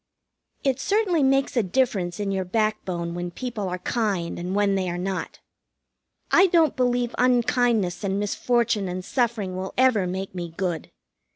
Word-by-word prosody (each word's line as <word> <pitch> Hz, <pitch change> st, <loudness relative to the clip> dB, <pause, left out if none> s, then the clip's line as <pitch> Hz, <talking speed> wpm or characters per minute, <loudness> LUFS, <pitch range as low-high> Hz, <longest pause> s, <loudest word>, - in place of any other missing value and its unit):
It 270 Hz, -2 st, +1 dB
certainly 395 Hz, -3 st, +1 dB
makes 270 Hz, +1 st, +2 dB
a 240 Hz, -, +4 dB
difference 190 Hz, -4 st, 0 dB
in 200 Hz, -1 st, -1 dB
your 190 Hz, -1 st, -1 dB
backbone 185 Hz, -4 st, -1 dB
when 175 Hz, 0 st, -4 dB
people 215 Hz, 0 st, -4 dB
are 180 Hz, -, -3 dB
kind 190 Hz, -4 st, -1 dB
and 180 Hz, +2 st, -3 dB
when 205 Hz, -1 st, +2 dB
they 190 Hz, -2 st, 0 dB
are 175 Hz, -, -3 dB
not. 190 Hz, +1 st, -4 dB, 0.9 s
I 380 Hz, -, +6 dB
don't 330 Hz, -5 st, +3 dB
believe 245 Hz, -1 st, +1 dB
unkindness 240 Hz, -6 st, +2 dB
and 195 Hz, 0 st, 0 dB
misfortune 210 Hz, 0 st, 0 dB
and 180 Hz, 0 st, -5 dB
suffering 225 Hz, -7 st, -1 dB
will 190 Hz, +1 st, -5 dB
ever 245 Hz, -7 st, +4 dB
make 190 Hz, +1 st, -4 dB
me 170 Hz, -3 st, -6 dB
good. 175 Hz, -4 st, -2 dB
205 Hz, 160 wpm, -24 LUFS, 185-245 Hz, 0.9 s, I